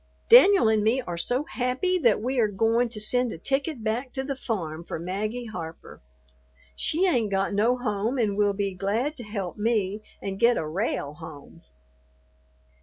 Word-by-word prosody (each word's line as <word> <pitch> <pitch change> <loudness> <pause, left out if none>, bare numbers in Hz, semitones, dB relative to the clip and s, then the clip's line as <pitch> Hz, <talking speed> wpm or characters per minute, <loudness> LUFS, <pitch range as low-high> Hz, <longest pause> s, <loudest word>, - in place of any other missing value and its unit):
Danyul 405 - +8
and 215 -1 +1
me 225 +5 +2
are 175 -8 -5
so 245 +11 0
happy 270 +7 -1
that 235 - +3
we 255 +1 -1
are 220 - +4
goin' 225 +4 +1
to 225 -2 -7
send 245 +3 0
a - - -6
ticket 270 - -2
back 235 +4 -2
to 265 - -2
the 275 0 -3
farm 170 -11 -4
for - - -5
Maggie 210 +8 -3
Harper. 170 -7 -8 0.7
She 335 - +1
ain't 240 - +2
got 195 0 0
no 225 +5 +2
home 220 +1 -1
and 215 -5 +1
will 205 0 +2
be 200 -1 -2
glad 215 +11 -1
to 245 - -7
help 200 -4 -5
me 210 -2 0 0.2
and 195 0 -5
get 235 +1 +4
a - - -2
rale 155 -3 -2
home." 160 0 -12
220 Hz, 180 wpm, -26 LUFS, 195-250 Hz, 0.7 s, Danyul